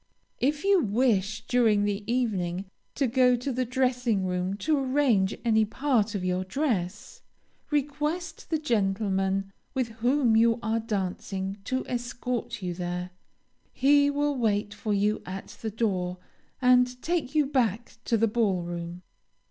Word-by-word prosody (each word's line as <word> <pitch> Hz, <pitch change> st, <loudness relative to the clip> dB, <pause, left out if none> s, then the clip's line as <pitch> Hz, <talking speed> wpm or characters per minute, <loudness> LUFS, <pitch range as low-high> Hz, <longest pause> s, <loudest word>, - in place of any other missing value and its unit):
If 290 Hz, +3 st, 0 dB
you 395 Hz, -1 st, +5 dB
wish, 215 Hz, -2 st, +1 dB
during 225 Hz, -5 st, +3 dB
the 205 Hz, 0 st, -1 dB
evening, 195 Hz, -7 st, -1 dB, 0.3 s
to 280 Hz, -, +1 dB
go 250 Hz, 0 st, +4 dB
to 245 Hz, +3 st, -3 dB
the 255 Hz, 0 st, -1 dB
dressing 250 Hz, -5 st, +1 dB
room 180 Hz, +1 st, -1 dB
to 305 Hz, +9 st, +1 dB
arrange 255 Hz, -8 st, +2 dB
any 220 Hz, -1 st, +4 dB
part 225 Hz, -1 st, 0 dB
of 185 Hz, -2 st, -2 dB
your 180 Hz, 0 st, 0 dB
dress, 205 Hz, -, -2 dB, 0.5 s
request 300 Hz, +3 st, -2 dB
the 320 Hz, -, +1 dB
gentleman 195 Hz, -6 st, 0 dB, 0.2 s
with 255 Hz, -3 st, 0 dB
whom 245 Hz, -1 st, +3 dB
you 230 Hz, +1 st, +4 dB
are 225 Hz, +1 st, +1 dB
dancing 195 Hz, -2 st, -3 dB
to 260 Hz, 0 st, -1 dB
escort 245 Hz, -3 st, -3 dB
you 180 Hz, -1 st, -2 dB
there. 180 Hz, 0 st, -4 dB, 0.6 s
He 285 Hz, +2 st, +4 dB
will 290 Hz, 0 st, 0 dB
wait 210 Hz, -4 st, 0 dB
for 210 Hz, +1 st, -4 dB
you 205 Hz, +1 st, +1 dB
at 190 Hz, +1 st, -7 dB
the 220 Hz, -, -2 dB
door, 190 Hz, -5 st, -1 dB, 0.5 s
and 250 Hz, 0 st, +4 dB
take 330 Hz, -4 st, -1 dB
you 300 Hz, -1 st, +4 dB
back 240 Hz, -5 st, -1 dB
to 230 Hz, -, +2 dB
the 225 Hz, +1 st, +3 dB
ball 205 Hz, -5 st, +1 dB
room. 175 Hz, +1 st, -6 dB
225 Hz, 145 wpm, -27 LUFS, 195-260 Hz, 0.6 s, you